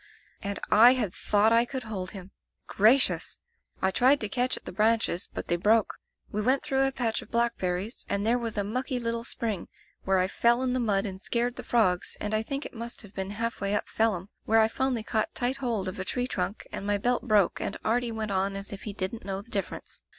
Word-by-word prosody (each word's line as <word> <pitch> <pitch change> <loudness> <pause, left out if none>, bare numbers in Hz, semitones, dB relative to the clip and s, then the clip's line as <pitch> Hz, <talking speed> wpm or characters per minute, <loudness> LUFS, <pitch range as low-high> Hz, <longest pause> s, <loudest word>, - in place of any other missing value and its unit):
"And 200 -1 -3
I 235 +4 +8
had 215 -8 -1
thought 210 +2 +2
I 230 +1 +6
could 255 +1 -5
hold 195 -5 -5
him! 190 -2 -10 0.3
Gracious! 230 +7 +3 0.5
I 190 - +3
tried 260 +8 +4
to 215 - -2
catch 250 +4 +1
at - - -12
the - - -6
branches, 215 -2 +1
but - - -6
they 175 - +1
broke. 215 +4 +3 0.4
We 210 - -1
went 260 +6 +2
through 270 -2 +2
a - - -1
patch 240 -4 -1
of - - -13
blackberries, 225 -3 -1
and 200 +1 0
there 240 +2 +3
was 230 -2 -3
a 205 - +2
mucky 250 +5 -2
little 230 -1 -2
spring, 220 -5 -3 0.4
where 190 0 +2
I 185 0 +3
fell 235 +5 +2
in 255 -1 0
the 255 - 0
mud 205 -4 +1
and 190 -2 -6
scared 240 +2 0
the - - -6
frogs, 185 -7 +1
and 210 +1 -2
I 215 - +2
think 275 +5 -4
it - - -7
must 235 0 -6
have 205 -1 -14
been 190 0 -3
half 230 +3 -3
way 200 +1 +1
up - - -1
Phelim, 205 -4 0 0.2
where 225 - +3
I 220 0 +6
finally 255 -1 -1
caught 220 -1 -1
tight 250 +2 0
hold 235 -8 -2
of 185 - -5
a - - -1
tree 245 +6 -1
trunk 190 -4 -3
and - - -5
my 205 0 +2
belt 245 +4 0
broke 210 -5 +3
and - - -2
Artie 235 +2 +1
went 220 -2 -3
on 195 +1 0
as 195 +1 -5
if 200 - -8
he 210 - -4
didn't 200 +3 -4
know 195 0 -4
the 235 - -22
dif 200 -2 -1
ference. - - -10
220 Hz, 240 wpm, -28 LUFS, 200-240 Hz, 0.5 s, I